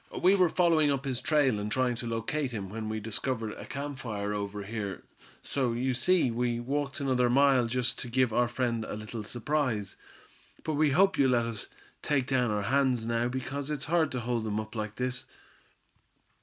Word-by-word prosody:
We 185 Hz, +2 st, +5 dB
were 185 Hz, -3 st, +4 dB
following 165 Hz, -4 st, +3 dB
up 135 Hz, 0 st, -1 dB
his 130 Hz, -2 st, -2 dB
trail, 135 Hz, -7 st, +3 dB
and 105 Hz, +1 st, -3 dB
trying 130 Hz, +1 st, +2 dB
to 120 Hz, -, -5 dB
locate 120 Hz, +4 st, -2 dB
him, 100 Hz, -4 st, -4 dB
when 110 Hz, +1 st, -4 dB
we 110 Hz, 0 st, -2 dB
discovered 110 Hz, +1 st, -2 dB
a -, -, -9 dB
camp 140 Hz, +2 st, -5 dB
fire 105 Hz, -5 st, -3 dB
over 100 Hz, 0 st, -3 dB
here. 100 Hz, -1 st, -5 dB, 0.4 s
So 130 Hz, -4 st, 0 dB
you 130 Hz, +2 st, 0 dB
see, 130 Hz, +2 st, +3 dB
we 120 Hz, 0 st, 0 dB
walked 140 Hz, +3 st, -2 dB
another 130 Hz, -3 st, +2 dB
mile 135 Hz, -1 st, +4 dB
just 125 Hz, +1 st, -1 dB
to -, -, -4 dB
give 125 Hz, -1 st, +2 dB
our 120 Hz, +1 st, +3 dB
friend 120 Hz, -2 st, -1 dB
a -, -, -5 dB
little 110 Hz, +1 st, -6 dB
surprise. 120 Hz, -3 st, -1 dB, 0.7 s
But 155 Hz, -, -1 dB
we 150 Hz, 0 st, +3 dB
hope 190 Hz, +6 st, +3 dB
you'll 135 Hz, -2 st, +5 dB
let 120 Hz, -1 st, +2 dB
us 115 Hz, -3 st, -2 dB, 0.3 s
take 140 Hz, -3 st, +1 dB
down 125 Hz, -3 st, +1 dB
our 105 Hz, -1 st, 0 dB
hands 130 Hz, 0 st, +2 dB
now, 115 Hz, +1 st, +1 dB
because 135 Hz, +3 st, -4 dB
it's 150 Hz, -3 st, -2 dB
hard 160 Hz, -1 st, +2 dB
to 125 Hz, -, -2 dB
hold 120 Hz, -1 st, -1 dB
them 110 Hz, -1 st, -1 dB
up 110 Hz, 0 st, -6 dB
like 105 Hz, -2 st, -4 dB
this." 125 Hz, 0 st, -3 dB
125 Hz, 195 wpm, -29 LUFS, 110-140 Hz, 0.7 s, We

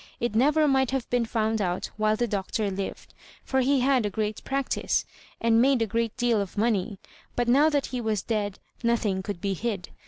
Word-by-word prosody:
It 240 Hz, -2 st, -1 dB
never 295 Hz, +7 st, +4 dB
might 265 Hz, -2 st, +3 dB
have 265 Hz, -3 st, -2 dB
been 245 Hz, -2 st, +1 dB
found 220 Hz, -1 st, 0 dB
out 180 Hz, -2 st, -2 dB
while 215 Hz, 0 st, +2 dB
the 240 Hz, -, 0 dB
Doctor 200 Hz, 0 st, -2 dB
livwl, 195 Hz, +1 st, -5 dB, 0.4 s
for 265 Hz, 0 st, +1 dB
he 270 Hz, +1 st, +2 dB
had 260 Hz, -2 st, +3 dB
a 205 Hz, -, 0 dB
great 210 Hz, +1 st, -3 dB
practice, 275 Hz, 0 st, -1 dB, 0.3 s
and 230 Hz, 0 st, +4 dB
made 265 Hz, 0 st, +4 dB
a -, -, +1 dB
great 230 Hz, +2 st, -2 dB
deal 240 Hz, -4 st, +2 dB
of 200 Hz, +1 st, -6 dB
money; 210 Hz, -2 st, 0 dB, 0.4 s
but 240 Hz, -1 st, 0 dB
now 280 Hz, +6 st, +5 dB
that 290 Hz, -3 st, +1 dB
he 250 Hz, -, -1 dB
was 215 Hz, -3 st, -1 dB
dead, 205 Hz, -3 st, -2 dB, 0.3 s
nothing 220 Hz, -5 st, +1 dB
could 195 Hz, -2 st, -5 dB
be 195 Hz, +2 st, -1 dB
hid. 200 Hz, -2 st, -3 dB
225 Hz, 200 wpm, -26 LUFS, 205-255 Hz, 0.4 s, now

